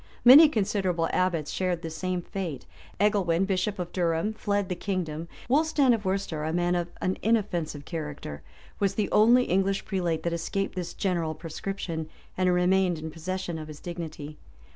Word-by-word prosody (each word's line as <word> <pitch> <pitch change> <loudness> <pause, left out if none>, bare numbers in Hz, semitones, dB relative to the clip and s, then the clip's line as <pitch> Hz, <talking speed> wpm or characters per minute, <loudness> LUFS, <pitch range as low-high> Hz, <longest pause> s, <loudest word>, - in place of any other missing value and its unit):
Many 290 +6 +10
considerable 195 - 0
abbots 170 -5 0
shared 180 -2 -1
the 165 - -4
same 180 +2 -2
fate: 170 -10 -5 0.3
Egelwin, 195 -4 +2
bishop 195 +1 -1
of 180 -1 -4
Durham, 170 +3 0
fled 205 -2 -1
the 180 - -2
kingdom 170 -4 -3 0.2
Wulstan, 285 -1 +3
of 215 -3 -2
Worcester, 185 -5 -1
a 160 - -1
man 175 +1 +1
of 175 -1 0
an 185 - -1
inoffensive 175 -10 0
character 150 - -6 0.4
was 195 -1 +1
the 210 -2 -1
only 240 +4 +6
English 195 -1 0
prelate 175 -5 -1
that 170 - -1
escaped 195 +4 -2
this 180 -2 -5
general 170 -5 -1
proscription,[*] 165 0 -5 0.3
and 185 -1 +2
remained 180 0 +3
in 160 0 -6
possession 175 +1 -4
of 155 - -7
his 150 -1 -9
dignity. 155 -4 -7
180 Hz, 165 wpm, -27 LUFS, 165-195 Hz, 0.4 s, Many